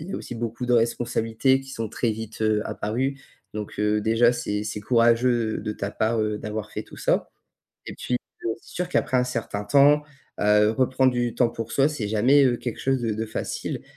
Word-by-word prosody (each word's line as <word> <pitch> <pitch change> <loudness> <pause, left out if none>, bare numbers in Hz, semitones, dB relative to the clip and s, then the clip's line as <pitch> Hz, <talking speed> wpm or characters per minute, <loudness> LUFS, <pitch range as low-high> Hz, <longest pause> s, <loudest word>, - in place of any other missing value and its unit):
il 175 - -8
y - - -5
a - - -2
aussi 120 - -7
beaucoup 115 +2 -4
de 125 - +1
responsabilités 120 +2 +1
qui 135 0 -12
sont 115 -4 -4
très 115 +2 -1
vite, 110 0 -6
heu, 110 -1 +2
apparues. 125 +6 -2 0.3
Donc, 105 -1 -6
heu, 105 0 +2
déjà 115 +3 +3
c'est 105 -3 -3
c'est 105 - -4
courageux 115 0 +2
de 105 - -4
ta 100 -1 -5
part, 110 +1 0
heu, 105 -1 -1
d'avoir 105 0 -5
fait 105 - -4
tout - - -14
ça. - - 0 0.6
Et - - -6
puis, 125 - -2 0.3
heu, 115 - -1
c'est - - -22
sûr 180 +1 -2
qu'après 130 - 0
un 125 - +4
certain 115 -4 -3
temps, 145 +7 +5 0.4
heu, 105 +1 +4
reprendre 130 +1 +2
du 120 -1 -1
temps 120 -1 +3
pour 115 -1 -6
soi, 140 +1 +3
c'est 115 -9 -3
jamais, 130 +7 +4
heu, 120 -2 +2
quelque 120 -3 -5
chose 135 -1 +1
de 115 -2 -1
de 110 +1 -3
facile. 110 - -4
115 Hz, 215 wpm, -24 LUFS, 110-125 Hz, 0.6 s, temps